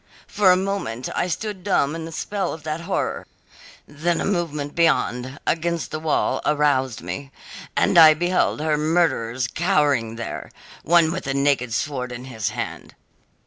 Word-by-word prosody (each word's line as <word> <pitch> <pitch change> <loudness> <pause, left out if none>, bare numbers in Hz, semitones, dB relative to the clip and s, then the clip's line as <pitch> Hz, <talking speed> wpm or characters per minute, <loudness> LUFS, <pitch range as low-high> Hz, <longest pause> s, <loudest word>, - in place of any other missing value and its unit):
For 200 -3 +3
a 180 - +5
moment 185 - -3
I - - 0
stood 190 +1 -4
dumb 155 -7 +1
in 165 -1 -5
the 165 - -8
spell 195 +3 -3
of 160 - -9
that 155 +1 -3
horror, - - -2 0.6
then 160 +4 -1
a - - -1
movement 150 -7 -2
beyond, 130 -5 +1
against 170 0 -1
the 155 - -3
wall, 155 -1 0
aroused 140 -5 +1
me, 140 -1 -6 0.5
and - - +3
I 155 -1 +9
beheld 175 -1 +1
her 155 -1 +1
murderers 130 -7 +1
cowering 145 - +1
there, 115 0 -6 0.3
one 170 -1 +4
with 185 -3 -5
a 135 - -1
naked 140 -3 +1
sword 125 +1 -2
in 120 +1 -7
his 110 -8 -3
hand. - - -6
155 Hz, 160 wpm, -22 LUFS, 130-170 Hz, 0.6 s, I